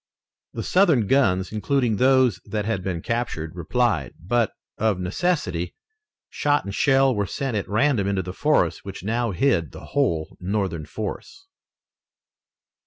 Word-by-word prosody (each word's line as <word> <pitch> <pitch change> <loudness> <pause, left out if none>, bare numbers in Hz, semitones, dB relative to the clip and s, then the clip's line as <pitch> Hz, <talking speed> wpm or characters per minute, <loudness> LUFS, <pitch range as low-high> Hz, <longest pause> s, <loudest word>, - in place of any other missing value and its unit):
The - - -4
Southern 165 - +3
guns, 95 -7 +2
including 115 +1 0
those 130 -6 +3
that 105 0 -3
had 105 -4 -1
been 90 -3 -3
captured, 115 -10 -2
replied, 90 - 0
but, 115 +6 +1 0.3
of 110 -4 +1
necessity, 90 - -1 0.5
shot 145 -4 0
and 100 - -5
shell 135 +2 +4
were 105 -3 -1
sent 135 +1 -3
at 100 - -2
random 110 -1 +2
into 100 -1 0
the 90 +1 -6
forest 150 +8 +1
which 100 -1 -8
now 115 +3 0
hid 90 - +1
the - - -10
whole 85 - 0
Northern 95 -5 -2
force. 110 - -6
110 Hz, 140 wpm, -24 LUFS, 95-130 Hz, 0.5 s, shell